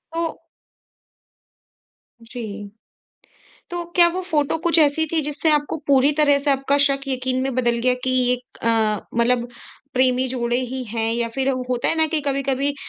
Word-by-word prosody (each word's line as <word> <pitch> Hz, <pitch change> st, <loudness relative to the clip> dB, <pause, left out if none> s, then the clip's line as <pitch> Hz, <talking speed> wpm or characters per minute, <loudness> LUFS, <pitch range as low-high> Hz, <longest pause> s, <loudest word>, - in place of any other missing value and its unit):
वो 330 Hz, -1 st, -3 dB, 1.8 s
जी। 220 Hz, -4 st, -8 dB, 1.0 s
तो 350 Hz, 0 st, -4 dB
क्या 345 Hz, -1 st, +7 dB
वो 370 Hz, -, -2 dB
फ़ोटो 310 Hz, -4 st, 0 dB
कुछ 340 Hz, -1 st, +3 dB
ऐसी 310 Hz, +1 st, +3 dB
थी 320 Hz, -, +2 dB
जिससे 300 Hz, +2 st, 0 dB
आपको 295 Hz, +1 st, 0 dB
पूरी 275 Hz, 0 st, +4 dB
तरह 290 Hz, -1 st, +3 dB
से 285 Hz, +1 st, -1 dB
आपका 275 Hz, +1 st, +1 dB
शक 275 Hz, -1 st, 0 dB
यकीन 255 Hz, -1 st, -1 dB
में 265 Hz, -2 st, -2 dB
बदल 240 Hz, -2 st, +1 dB
गया 250 Hz, +1 st, +2 dB
कि 260 Hz, -, +1 dB, 0.2 s
एक 250 Hz, 0 st, -7 dB
अ, 225 Hz, -2 st, +3 dB, 0.2 s
मतलब 240 Hz, +1 st, +1 dB, 0.5 s
प्रेमी 255 Hz, 0 st, +3 dB
जोड़े 240 Hz, -1 st, -1 dB
ही 255 Hz, +1 st, -4 dB
हैं? 225 Hz, 0 st, -2 dB
या 235 Hz, 0 st, -1 dB
फिर 270 Hz, 0 st, 0 dB, 0.2 s
होता 245 Hz, -1 st, 0 dB
है -, -, +1 dB
ना 320 Hz, -, +3 dB
कि 315 Hz, 0 st, 0 dB
कभी-कभी 275 Hz, 0 st, -1 dB
265 Hz, 165 wpm, -21 LUFS, 240-290 Hz, 1.8 s, क्या